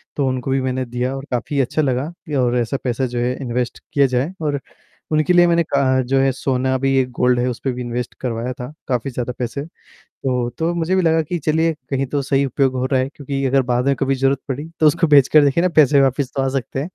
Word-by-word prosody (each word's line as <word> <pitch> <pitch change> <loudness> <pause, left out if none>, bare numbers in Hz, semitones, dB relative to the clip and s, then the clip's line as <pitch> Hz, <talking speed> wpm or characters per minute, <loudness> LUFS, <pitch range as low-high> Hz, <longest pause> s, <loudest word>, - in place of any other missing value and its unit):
तो 140 -2 0
उनको 130 0 -2
भी 135 - +1
मैंने 130 0 -2
दिया 125 +2 -3
और 135 - -7
काफ़ी 125 +3 -1
अच्छा 135 +4 0
लगा 135 +2 -1 0.3
और 125 0 +2
ऐसा 120 +3 -1
पैसा 125 +1 -1
जो 120 -1 -3
है 125 +1 0
इन्वेस्ट 125 -1 -3
किया 140 -1 +4
जाए 130 +7 -1
और 145 -3 -1 0.5
उनके 155 +3 +2
लिए 175 0 +6
मैंने 170 0 +3
का 140 -3 0 0.3
जो 135 +2 +1
है 135 0 +3
सोना 130 0 0
भी 135 +1 +1
एक 130 -1 +2
गोल्ड 125 0 +2
है 125 - +1
उसपे 125 +2 -3
भी 125 - -6
इन्वेस्ट 120 0 -4
करवाया 120 0 -2
था। 125 0 -7 0.2
काफ़ी 125 0 -1
ज़्यादा 125 0 -3
पैसे। 125 +3 -3 0.4
तो 125 -2 -3
तो 165 +1 0
मुझे 170 +2 0
भी 185 - +2
लगा 160 -1 +3
कि 175 +3 -3
चलिए 160 +2 +1 0.2
कहीं 135 0 0
तो 140 +2 -2
सही 135 +1 +1
उपयोग 135 0 +1
हो 125 - 0
रहा 130 -1 +1
है, 130 - -1
क्योंकि 140 -1 -4
अगर 135 0 +3
बाद 125 +1 0
में 140 - +3
कभी 135 +1 0
जरूरत 135 +1 +1
पड़ी 145 +4 -4
तो 155 - +5
उसको 165 +3 +3
बेच 140 -3 +6
कर 155 -1 +6
देखिए 145 +5 +2
ना 185 - +3
पैसे 145 -2 +6
वापस 135 0 +1
तो 135 - +1
आ 135 - +1
सकते 135 +1 -3
हैं। 160 +6 -5
135 Hz, 250 wpm, -20 LUFS, 125-145 Hz, 0.5 s, लिए